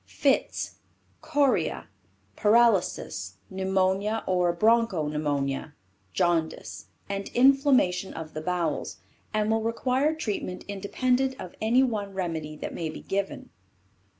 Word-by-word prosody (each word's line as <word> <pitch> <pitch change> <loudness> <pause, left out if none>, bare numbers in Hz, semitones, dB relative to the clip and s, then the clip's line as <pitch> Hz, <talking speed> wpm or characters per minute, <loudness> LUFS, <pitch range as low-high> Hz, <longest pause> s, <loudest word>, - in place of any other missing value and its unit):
Fits, - - 0 0.4
Chorea, 290 -3 +1 0.5
Paralysis, 210 - +2
Pneumonia 190 +3 0
or 180 -2 +2
Bronco 215 -4 +2
Pneumonia, 145 -1 -2 0.4
Jaundice, 165 - -1 0.2
and 200 0 -4
Inflammation 255 -8 +4
of 160 -1 -7
the 155 - -4
Bowels, 175 0 -2 0.3
and 215 0 +1
will 225 0 +2
require 255 +6 +1
treatment 205 -9 -4
independent 250 +6 0
of 180 - -8
any 235 +4 +4
one 205 -6 -2
remedy 160 -5 -3
that - - -6
may 165 -2 -3
be 155 - -8
given. 195 0 -3
195 Hz, 110 wpm, -27 LUFS, 170-235 Hz, 0.5 s, Inflammation